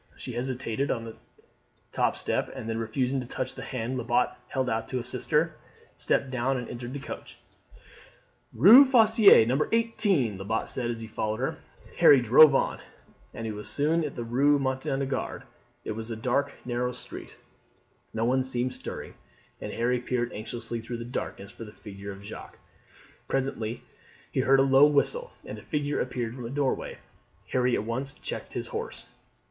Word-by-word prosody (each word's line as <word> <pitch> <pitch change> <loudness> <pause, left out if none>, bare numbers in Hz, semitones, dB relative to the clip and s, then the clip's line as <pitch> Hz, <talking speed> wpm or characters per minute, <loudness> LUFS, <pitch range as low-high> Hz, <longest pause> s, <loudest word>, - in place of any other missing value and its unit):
She - - -7
hesitated 130 +1 -2
on 115 - -1
the 115 - -8 0.8
top - - +1
step, - - -2
and 110 - -6
then 115 0 -2
refusing 125 +4 -1
to 125 - -6
touch 130 +1 -3
the - - -8
hand 130 +1 -3
Lebat 120 +1 +1
held 130 0 -1
out 110 -2 -1
to 130 - -3
assist 125 +1 -4
her, 160 +2 +2 0.4
stepped 135 - 0
down 130 +1 0
and 125 - -5
entered 120 +1 -7
the 140 - -4
coach. 140 - -9 1.1
"Rue 210 - +9
Fosseuse 225 - +7
No. 130 +5 +1
18," 205 - +1
Lebat 110 +3 -2
said 120 -2 -2
as 115 -1 -4
he 110 - -6
followed 110 0 -3
her. - - -2 0.4
Harry 140 - +8
drove 135 +5 +7
on, - - 0 0.5
and 115 -1 -5
was 105 0 -5
soon 160 +3 +1
in 150 - -4
the 120 - -4
Rue 135 +5 +3
Montagnard. 135 0 -2 0.4
It - - -3
was 110 +1 -6
a 115 - -3
dark 130 +5 0
narrow 125 0 -1
street; - - -9 0.7
no 115 +1 -1
one 130 +2 +2
seemed 130 -1 -1
stirring, - - -7 0.5
and - - -5
Harry 125 +2 0
peered 120 -1 -2
anxiously 115 +2 -5
through 120 +1 -5
the 115 - -6
darkness 100 -5 -5
for - - -10
the 105 - -10
figure 100 -2 -9
of 100 0 -11
Jacques. 105 - -10 0.7
Presently 125 -4 -2 0.5
he - - -1
heard 135 +3 +4
a - - +6
low 135 +2 +6
whistle, 470 - +1
and - - -7
a - - -12
figure 145 -1 -1
appeared 120 -2 -3
from 125 -2 -7
a - - -5
doorway. 140 0 -1 0.5
Harry 125 -1 +2
at - - -1
once 130 +5 -4
checked - - -7
the - - -3
horse. - - -6
125 Hz, 175 wpm, -27 LUFS, 115-140 Hz, 1.1 s, Rue